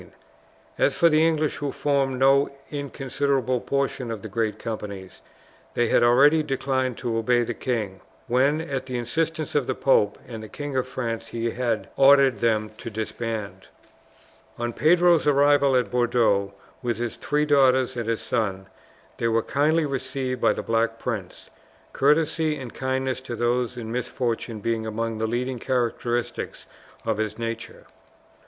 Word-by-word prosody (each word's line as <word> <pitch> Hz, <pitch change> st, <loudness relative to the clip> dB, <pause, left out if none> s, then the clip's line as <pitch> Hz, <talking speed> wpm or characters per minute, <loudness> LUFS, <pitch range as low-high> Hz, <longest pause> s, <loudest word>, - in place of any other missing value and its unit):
As -, -, +3 dB
for 170 Hz, -, +5 dB
the 155 Hz, 0 st, +4 dB
English 155 Hz, -2 st, +1 dB
who 145 Hz, -1 st, -3 dB
formed 140 Hz, -2 st, 0 dB
no 135 Hz, +2 st, +4 dB, 0.2 s
inconsiderable 135 Hz, -3 st, -1 dB
portion 140 Hz, -3 st, -1 dB
of 110 Hz, -3 st, -5 dB
the -, -, -5 dB
great 110 Hz, 0 st, -1 dB
companies, 100 Hz, -5 st, -7 dB, 0.5 s
they 120 Hz, -1 st, +2 dB
had -, -, +4 dB
already 140 Hz, +7 st, +5 dB
declined 130 Hz, -3 st, -1 dB
to 120 Hz, -2 st, -2 dB
obey 120 Hz, +1 st, +2 dB
the 120 Hz, -, -3 dB
king, 110 Hz, -7 st, -3 dB, 0.2 s
when, 135 Hz, +5 st, +2 dB
at 135 Hz, -5 st, -4 dB
the 125 Hz, -1 st, -3 dB
insistence 155 Hz, +6 st, -2 dB
of 145 Hz, -4 st, +1 dB
the 130 Hz, -, -1 dB
pope 105 Hz, -6 st, +2 dB
and 115 Hz, -3 st, -7 dB
the 110 Hz, -, -9 dB
King 145 Hz, -2 st, -6 dB
of 130 Hz, -1 st, 0 dB
France, 115 Hz, -3 st, -4 dB
he 115 Hz, 0 st, -2 dB
had 120 Hz, -3 st, -1 dB
ordered 135 Hz, -4 st, +6 dB
them 110 Hz, -2 st, +1 dB
to -, -, -6 dB
disband. 110 Hz, -1 st, -5 dB, 0.9 s
On 120 Hz, 0 st, -3 dB
Pedro's 170 Hz, +2 st, +4 dB
arrival 145 Hz, -1 st, +4 dB
at 125 Hz, -1 st, +1 dB
Bordeaux 115 Hz, -5 st, +2 dB, 0.3 s
with 120 Hz, -4 st, -1 dB
his 120 Hz, 0 st, -3 dB
three 150 Hz, +5 st, 0 dB
daughters 130 Hz, -3 st, +3 dB
and 115 Hz, -2 st, -3 dB
his 115 Hz, -, -1 dB
son, 100 Hz, -5 st, -2 dB, 0.5 s
they 115 Hz, -, +1 dB
were 115 Hz, 0 st, +2 dB
kindly 155 Hz, +3 st, +2 dB
received 130 Hz, -2 st, -3 dB
by -, -, +4 dB
the -, -, -5 dB
Black 115 Hz, 0 st, 0 dB
Prince, 110 Hz, -7 st, -5 dB, 0.4 s
courtesy 155 Hz, +2 st, +2 dB
and 125 Hz, -3 st, -8 dB
kindness 130 Hz, 0 st, -2 dB
to 125 Hz, -2 st, -6 dB
those 120 Hz, +1 st, 0 dB
in 115 Hz, -2 st, -6 dB
misfortune 120 Hz, -2 st, -3 dB
being 115 Hz, 0 st, -1 dB
among 115 Hz, 0 st, -3 dB
the 110 Hz, -, 0 dB
leading 125 Hz, +2 st, -2 dB
characteristics 120 Hz, -1 st, -2 dB, 0.4 s
of 110 Hz, -2 st, 0 dB
his 110 Hz, -1 st, -2 dB
nature. 115 Hz, 0 st, -6 dB
125 Hz, 155 wpm, -24 LUFS, 115-140 Hz, 0.9 s, ordered